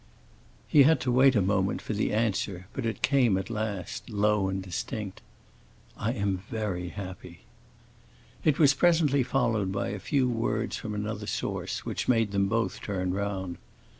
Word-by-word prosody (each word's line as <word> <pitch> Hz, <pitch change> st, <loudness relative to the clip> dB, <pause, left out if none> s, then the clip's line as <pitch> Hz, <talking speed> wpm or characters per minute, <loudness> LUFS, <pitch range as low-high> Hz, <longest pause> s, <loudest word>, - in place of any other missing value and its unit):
He 150 Hz, -, +6 dB
had 160 Hz, +4 st, +6 dB
to 125 Hz, -, 0 dB
wait 130 Hz, +1 st, +5 dB
a 105 Hz, -, +3 dB
moment 95 Hz, 0 st, +1 dB
for -, -, -4 dB
the 105 Hz, -, 0 dB
answer; 100 Hz, -4 st, -1 dB
but 125 Hz, -4 st, -2 dB
it 115 Hz, +1 st, -4 dB
came 125 Hz, -6 st, +4 dB
at 95 Hz, +4 st, -4 dB
last, 105 Hz, -3 st, -4 dB
low 105 Hz, -2 st, +2 dB
yet 95 Hz, 0 st, -3 dB
distinct: 95 Hz, +2 st, -5 dB, 0.7 s
"I 115 Hz, +3 st, -1 dB
am 100 Hz, -5 st, -1 dB
very 100 Hz, -6 st, -3 dB
happy." 90 Hz, -1 st, -8 dB, 1.0 s
It 150 Hz, -2 st, +3 dB
was 145 Hz, -4 st, +6 dB
presently 155 Hz, -3 st, +3 dB
followed 115 Hz, -6 st, +1 dB
by 100 Hz, -, -2 dB
a 105 Hz, -, -4 dB
few 130 Hz, +6 st, +1 dB
words 115 Hz, -2 st, -1 dB
from 105 Hz, -1 st, -5 dB
another 105 Hz, 0 st, -4 dB
source, -, -, -3 dB
which -, -, -3 dB
made 115 Hz, -4 st, +3 dB
them 100 Hz, -1 st, +2 dB
both 115 Hz, -3 st, -1 dB
turn 95 Hz, -3 st, -2 dB
round. 95 Hz, -3 st, -3 dB
105 Hz, 165 wpm, -28 LUFS, 95-120 Hz, 1.0 s, He